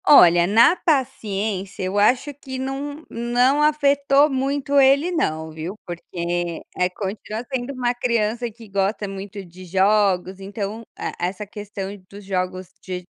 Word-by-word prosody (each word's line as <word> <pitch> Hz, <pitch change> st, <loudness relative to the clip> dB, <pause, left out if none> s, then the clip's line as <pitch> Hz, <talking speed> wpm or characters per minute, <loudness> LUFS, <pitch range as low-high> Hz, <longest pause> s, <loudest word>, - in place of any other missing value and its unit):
Olha, 175 Hz, -10 st, +8 dB
na 230 Hz, -, +6 dB
paciência, 210 Hz, -, -1 dB
eu 190 Hz, +2 st, 0 dB
acho 250 Hz, +7 st, +3 dB
que 265 Hz, -1 st, -8 dB
não 280 Hz, +3 st, -4 dB
não 245 Hz, +4 st, +2 dB
afetou 285 Hz, -1 st, +4 dB
muito 280 Hz, +1 st, +1 dB
ele 275 Hz, +6 st, +5 dB
não, 160 Hz, -, -1 dB
viu, 160 Hz, +5 st, -6 dB
porque 175 Hz, -1 st, -3 dB, 0.3 s
continua 215 Hz, +3 st, -5 dB
sendo 260 Hz, +1 st, -2 dB
uma 245 Hz, -2 st, 0 dB
criança 235 Hz, -1 st, 0 dB
que 225 Hz, 0 st, -14 dB
gosta 200 Hz, +1 st, -1 dB
muito 195 Hz, 0 st, -7 dB
de 180 Hz, +2 st, -13 dB
jogos, 190 Hz, 0 st, +2 dB
então 200 Hz, +2 st, -5 dB, 0.2 s
e -, -, -6 dB, 0.2 s
essa 185 Hz, +4 st, -2 dB
questão 205 Hz, -1 st, -6 dB
dos 200 Hz, 0 st, -11 dB
jogos 185 Hz, -1 st, -2 dB
de 180 Hz, -1 st, -5 dB
210 Hz, 135 wpm, -22 LUFS, 190-265 Hz, 0.3 s, Olha